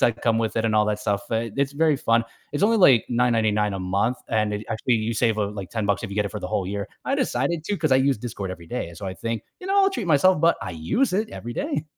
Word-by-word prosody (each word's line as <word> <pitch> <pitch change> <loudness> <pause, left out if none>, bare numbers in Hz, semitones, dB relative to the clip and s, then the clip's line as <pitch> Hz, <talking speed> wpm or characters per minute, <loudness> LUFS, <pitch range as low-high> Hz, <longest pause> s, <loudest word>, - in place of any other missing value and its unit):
that 120 0 +2
come 115 -1 +2
with 115 -1 -1
it 115 0 +1
and 110 - 0
all 105 - +4
that 105 0 -1
stuff, 100 -2 -1
uh, 115 +1 0
it's 140 0 0
very 155 -1 +2
fun. 115 -2 +2 0.3
It's 145 - -2
only, 225 +2 +4
like, 135 - +6
$9.99 110 -4 +2
a 95 - -3
month, 100 +7 0
and 110 -1 +1
it 105 +1 -4
actually, 115 +2 +1
you 115 +2 -2
save, 110 -1 +1
uh, 100 -1 0
like, 100 -3 -7
$10 105 -3 -1
if 110 - -5
you - - -5
get 105 - +1
it - - -6
for 105 - -6
the 90 - -4
whole 90 0 -1
year. 100 0 -3 0.2
I - - +1
decided 150 +6 -1
to 205 - -1
'cause 155 -2 0
I 130 - +6
use 135 -3 +2
Discord 105 -5 -5
every 85 -2 -9
day 125 -4 -4
and 85 -1 -12
so 100 - -6
I 95 - -4
think, 115 +1 -4 0.2
"You 365 - -8
know, 395 +1 +2
I'll 390 - +5
treat 230 - -4
myself," 170 +4 +4
but 170 - +4
I 95 - -5
use 180 - 0
it 215 +3 0
every 120 0 -7
day. 150 +1 -2
115 Hz, 290 wpm, -24 LUFS, 105-140 Hz, 0.3 s, like